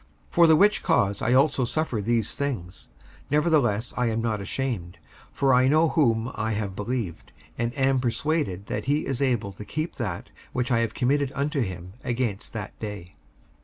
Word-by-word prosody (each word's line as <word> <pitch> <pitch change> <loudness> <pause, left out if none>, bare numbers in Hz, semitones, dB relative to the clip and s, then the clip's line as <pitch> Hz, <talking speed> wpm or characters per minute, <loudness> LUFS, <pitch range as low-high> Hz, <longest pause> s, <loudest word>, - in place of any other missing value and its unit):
55:001:012 - - -31
For 170 -1 +6
the 160 - +7
which 205 +6 +4
cause 100 0 +1
I 120 - +2
also 135 0 +4
suffer 125 -3 -1
these 115 0 0
things: 100 -11 -4 0.4
nevertheless 145 -8 +2
I 125 -1 +1
am 115 0 0
not 110 -3 -1
ashamed: 100 -7 -3 0.3
for 135 -1 +2
I 125 +1 +5
know 155 +3 +4
whom 115 -5 +2
I 110 +1 -2
have 100 -2 -3
believed, 105 -4 -4 0.2
and 115 0 -1
am 135 -1 +3
persuaded 125 - -1
that - - -3
he 145 +3 +1
is 135 -1 -2
able 120 -7 +1
to 100 +2 -9
keep 155 +9 -4
that 100 -9 -4 0.2
which 125 0 -1
I 115 - +4
have 115 -1 -1
committed 135 +2 +1
unto 140 +1 0
him 90 -4 -5
against 120 -5 -2
that 105 -3 -6
day. 105 -5 -7
120 Hz, 180 wpm, -26 LUFS, 105-140 Hz, 0.4 s, the